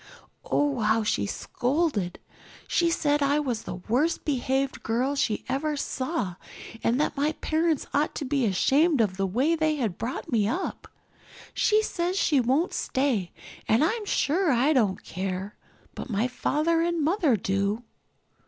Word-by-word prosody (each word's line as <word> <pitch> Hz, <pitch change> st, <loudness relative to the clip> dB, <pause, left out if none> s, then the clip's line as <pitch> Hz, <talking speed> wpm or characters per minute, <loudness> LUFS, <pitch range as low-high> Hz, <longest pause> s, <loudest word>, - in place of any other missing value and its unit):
Oh, 285 Hz, -3 st, 0 dB
how 220 Hz, +1 st, +2 dB
she 100 Hz, -, 0 dB
scolded. 245 Hz, -, -1 dB, 0.5 s
She 340 Hz, -1 st, +2 dB
said 295 Hz, -3 st, +1 dB
I 285 Hz, +1 st, +3 dB
was 250 Hz, -6 st, -2 dB
the -, -, -6 dB
worst 250 Hz, -, 0 dB
behaved 270 Hz, -1 st, -1 dB
girl 250 Hz, +5 st, 0 dB
she 225 Hz, -6 st, -1 dB
ever 290 Hz, +3 st, -1 dB
saw 255 Hz, -, -3 dB, 0.5 s
and 240 Hz, +3 st, +2 dB
that 300 Hz, -, 0 dB
my 290 Hz, +2 st, +1 dB
parents 315 Hz, -1 st, 0 dB
ought 290 Hz, +2 st, +1 dB
to 290 Hz, -, -3 dB
be 270 Hz, -1 st, +1 dB
ashamed 280 Hz, -, +3 dB
of 200 Hz, -4 st, +1 dB
the 195 Hz, 0 st, 0 dB
way 255 Hz, -, +1 dB
they 315 Hz, -1 st, +1 dB
had 230 Hz, -11 st, -2 dB
brought 240 Hz, +3 st, -4 dB
me 215 Hz, -4 st, +2 dB
up. 340 Hz, -, -3 dB, 0.7 s
She 430 Hz, 0 st, +3 dB
says 360 Hz, -1 st, -2 dB
she 295 Hz, -7 st, +3 dB
won't 265 Hz, +9 st, +1 dB
stay 255 Hz, -10 st, 0 dB, 0.4 s
and 225 Hz, +7 st, +4 dB
I'm 425 Hz, +6 st, 0 dB
sure 340 Hz, +2 st, +1 dB
I 265 Hz, +5 st, +3 dB
don't 215 Hz, -8 st, +1 dB
care. 190 Hz, +3 st, -4 dB, 0.4 s
But -, -, -7 dB, 0.2 s
Father 325 Hz, +5 st, +1 dB
and 340 Hz, -2 st, 0 dB
Mother 320 Hz, -, +2 dB
do." 200 Hz, +3 st, -1 dB
275 Hz, 155 wpm, -26 LUFS, 220-315 Hz, 0.7 s, and